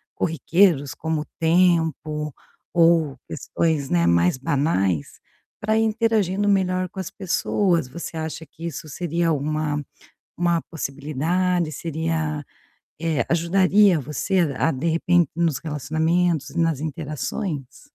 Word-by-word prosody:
corriqueiros, 165 Hz, -2 st, +2 dB
como 160 Hz, -1 st, -2 dB
o -, -, -6 dB
tempo, 160 Hz, -3 st, +2 dB, 0.4 s
ou 165 Hz, -5 st, +4 dB
questões, 155 Hz, -5 st, -1 dB
né, 85 Hz, -1 st, +2 dB
mais 85 Hz, +6 st, +3 dB
banais, 130 Hz, -, 0 dB, 0.4 s
para 215 Hz, +1 st, +1 dB
ir 225 Hz, -, +3 dB
interagindo 210 Hz, -3 st, +1 dB
melhor 185 Hz, -2 st, +1 dB
com 190 Hz, -, -9 dB
as 190 Hz, -, -4 dB
pessoas, 180 Hz, -4 st, 0 dB
você 165 Hz, +3 st, -7 dB
acha 160 Hz, 0 st, -5 dB
que 165 Hz, +3 st, -11 dB
isso 160 Hz, -1 st, -5 dB
seria 170 Hz, +1 st, -1 dB
uma 150 Hz, 0 st, -1 dB, 0.5 s
uma 170 Hz, -1 st, +1 dB
possibilidade, 160 Hz, +4 st, -1 dB
seria, 160 Hz, -1 st, -2 dB, 0.6 s
eh, 165 Hz, -2 st, 0 dB
ajudaria 185 Hz, +2 st, +4 dB
você 150 Hz, +7 st, -1 dB, 0.2 s
a 165 Hz, -, +2 dB
de 135 Hz, +6 st, -2 dB
repente, 170 Hz, 0 st, +3 dB
nos 165 Hz, -5 st, +1 dB
relacionamentos 160 Hz, +2 st, 0 dB
e 170 Hz, -, -3 dB
nas 165 Hz, -4 st, +1 dB
interações? 150 Hz, -, -4 dB
165 Hz, 120 wpm, -23 LUFS, 150-175 Hz, 0.6 s, ou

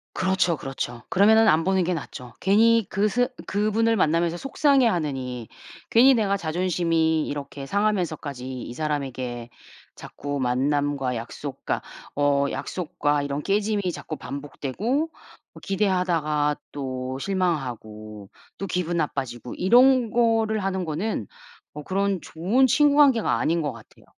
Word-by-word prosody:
그렇죠, 185 Hz, -3 st, +1 dB
그렇죠. 125 Hz, -3 st, -5 dB
그러면은 220 Hz, +4 st, +5 dB
안 160 Hz, -2 st, +4 dB
보는 190 Hz, 0 st, +2 dB
게 180 Hz, +1 st, 0 dB
낫죠. 125 Hz, -5 st, -8 dB
괜히 225 Hz, +3 st, +4 dB
그 200 Hz, +4 st, +1 dB
스 245 Hz, +4 st, +1 dB, 0.2 s
그분을 215 Hz, +3 st, +1 dB
만나면서 170 Hz, -2 st, +1 dB
속상해하느니 170 Hz, -, +1 dB, 0.4 s
괜히 255 Hz, +4 st, +6 dB
내가 205 Hz, -4 st, +1 dB
자존심이 165 Hz, -2 st, 0 dB
이렇게 140 Hz, -1 st, -6 dB
상하면서까지 155 Hz, -10 st, -2 dB
이 120 Hz, -, -7 dB
사람에게 130 Hz, -5 st, -3 dB, 0.5 s
자꾸 145 Hz, 0 st, -6 dB
만남과 135 Hz, +1 st, 0 dB
약속과 120 Hz, +4 st, -5 dB, 0.3 s
어 145 Hz, -1 st, +2 dB
약속과 150 Hz, -4 st, -2 dB
이런 140 Hz, +1 st, -3 dB
깨짐이 200 Hz, 0 st, 0 dB
자꾸 160 Hz, -, -6 dB
반복되고 140 Hz, -, -6 dB, 0.7 s
뭐 -, -, -12 dB
기대하다가 170 Hz, -7 st, 0 dB
또 130 Hz, -2 st, -4 dB
실망하고 120 Hz, -, -3 dB, 0.3 s
또 195 Hz, -, -3 dB
기분 175 Hz, -1 st, -1 dB
나빠지고 130 Hz, -6 st, -3 dB
이런 245 Hz, +3 st, +4 dB
거를 225 Hz, -3 st, +2 dB
하는 190 Hz, -1 st, -1 dB
거는 170 Hz, +8 st, -3 dB, 0.5 s
뭐 150 Hz, -, -8 dB
그런 195 Hz, +1 st, -1 dB
좋은 205 Hz, +12 st, +1 dB
친구 290 Hz, +3 st, +4 dB
관계가 270 Hz, -7 st, +4 dB
아닌 165 Hz, +1 st, +1 dB
것 145 Hz, -, -1 dB
같아요. 115 Hz, -3 st, -16 dB
165 Hz, 300 characters per minute, -24 LUFS, 140-200 Hz, 0.7 s, 괜히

